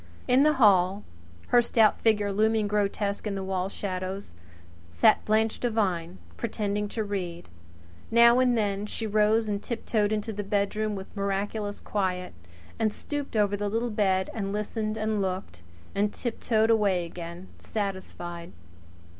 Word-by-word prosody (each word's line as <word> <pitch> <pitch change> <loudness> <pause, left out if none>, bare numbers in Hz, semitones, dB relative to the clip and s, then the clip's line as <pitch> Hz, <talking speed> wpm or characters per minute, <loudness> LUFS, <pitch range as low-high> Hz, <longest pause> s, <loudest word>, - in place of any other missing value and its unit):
In 255 +2 +5
the 305 +1 +5
hall, 200 -6 +4 0.5
her 245 - +6
stout 225 -2 +3
figure 210 -3 +2
looming 220 +1 +2
grotesque 205 0 -1
in 195 -2 -3
wall 190 0 -1
shadows, 190 - -5 0.6
sat 85 0 +4
Blanche 220 +1 +1
Devine 190 -7 -1 0.2
pretending 210 -2 -2
to 220 +1 -3
read. 180 -4 -4 0.6
Now 235 +1 +6
and 250 -2 +3
then 205 -1 -1
she 225 - -4
rose 215 +1 +2
and 205 -1 -2
tiptoed 220 -3 -1
into 215 +1 -2
the 205 0 -4
bedroom 205 +1 0
with 190 +1 -9
miraculous 205 +1 -2
quiet, 185 -3 -2 0.5
and 220 -1 +2
stooped 290 +2 -5
over 205 -1 +2
the 205 0 -2
little 230 +3 -1
bed 190 -3 +1
and 200 -3 -3
listened 215 +1 -2
and 215 -1 0
looked 185 - -4 0.3
and 205 +1 +1
tiptoed 225 -1 0
away 200 -6 +2
again, 170 +2 -8
satisfied. 185 -4 -5
205 Hz, 140 wpm, -27 LUFS, 195-220 Hz, 0.6 s, her